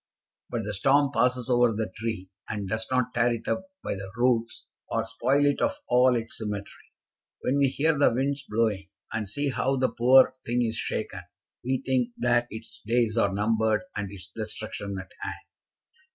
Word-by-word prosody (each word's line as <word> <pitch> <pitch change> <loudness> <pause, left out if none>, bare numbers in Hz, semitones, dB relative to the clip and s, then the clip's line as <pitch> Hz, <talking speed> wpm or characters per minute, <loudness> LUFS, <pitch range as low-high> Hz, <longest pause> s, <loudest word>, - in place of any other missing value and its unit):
"But 115 -2 -2
the 105 +1 -4
storm 135 +6 +3
passes 125 -1 +2
over 120 -2 +4
the 110 -2 -3
tree 105 -4 -4 0.2
and 105 -2 -3
does 110 +3 -2
not 125 -2 +1
tear 120 +1 +3
it 115 - -9
up 190 0 -1 0.2
by - - -2
the 95 -1 -7
roots 120 -1 +1 0.2
or 115 0 0
spoil 125 +5 +2
it 145 0 +2
of 285 0 +2 0.2
all 125 0 +5
its 115 -1 -3
symmetry. 105 -2 -6 0.5
When 140 +3 +1
we 140 - +5
hear 155 +4 +1
the 145 - +4
winds 140 +4 0
blowing, 105 -4 0 0.2
and 110 -3 -2
see 145 +7 -1
how 135 +2 +1
the 130 -1 +2
poor 130 +2 +6
thing 120 +1 +1
is 115 0 -1
shaken, 110 -4 -3 0.4
we 130 +1 -1
think 125 -2 +1
that 120 0 +2
its 110 +1 -10
days 115 0 +1
are 100 -4 +3
numbered 110 +2 +1
and 100 -1 -3
its 95 -2 -10
destruction 110 -2 -4
at 95 -1 -10
hand. - - -4
115 Hz, 180 wpm, -27 LUFS, 110-130 Hz, 0.5 s, poor